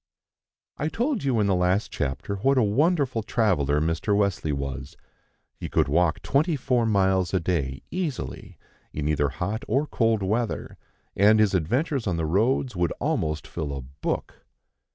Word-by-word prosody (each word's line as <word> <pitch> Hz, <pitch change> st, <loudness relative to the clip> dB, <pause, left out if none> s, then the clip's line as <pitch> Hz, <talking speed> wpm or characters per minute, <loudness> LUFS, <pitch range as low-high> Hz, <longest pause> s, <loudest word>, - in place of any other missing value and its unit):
I 150 Hz, -, -1 dB
TOLD 245 Hz, -, -1 dB
you 130 Hz, -5 st, +1 dB
in 105 Hz, -, +3 dB
the 100 Hz, -, +2 dB
last 90 Hz, +3 st, +1 dB
chapter 70 Hz, +8 st, -3 dB
what 135 Hz, +7 st, +2 dB
a 125 Hz, -, +5 dB
wonderful 135 Hz, -, +2 dB
traveller 90 Hz, -, +1 dB
Mr. 80 Hz, +6 st, 0 dB
Wesley 100 Hz, -6 st, 0 dB
was; 70 Hz, -1 st, -5 dB, 0.6 s
he -, -, -6 dB
could -, -, +2 dB
walk 85 Hz, +2 st, +1 dB
twenty 155 Hz, +4 st, +2 dB
four 125 Hz, -3 st, +1 dB
miles 95 Hz, -3 st, +2 dB
a -, -, +3 dB
day 75 Hz, -6 st, -2 dB
easily, 145 Hz, -, -4 dB, 0.3 s
in 75 Hz, -1 st, -3 dB
either 75 Hz, -2 st, +1 dB
hot 100 Hz, -, -3 dB
or 135 Hz, +7 st, +1 dB
cold 115 Hz, -7 st, +1 dB
weather, 110 Hz, +4 st, -2 dB, 0.4 s
and 105 Hz, +2 st, +5 dB
his 105 Hz, -2 st, +3 dB
adventures 120 Hz, -, 0 dB
on 90 Hz, -3 st, 0 dB
the 80 Hz, -, -1 dB
roads 115 Hz, -, +1 dB
would 85 Hz, -1 st, 0 dB
almost 75 Hz, -2 st, -1 dB
fill 75 Hz, -2 st, -4 dB
a -, -, -5 dB
book. 70 Hz, +4 st, -5 dB
100 Hz, 160 wpm, -25 LUFS, 80-120 Hz, 0.6 s, a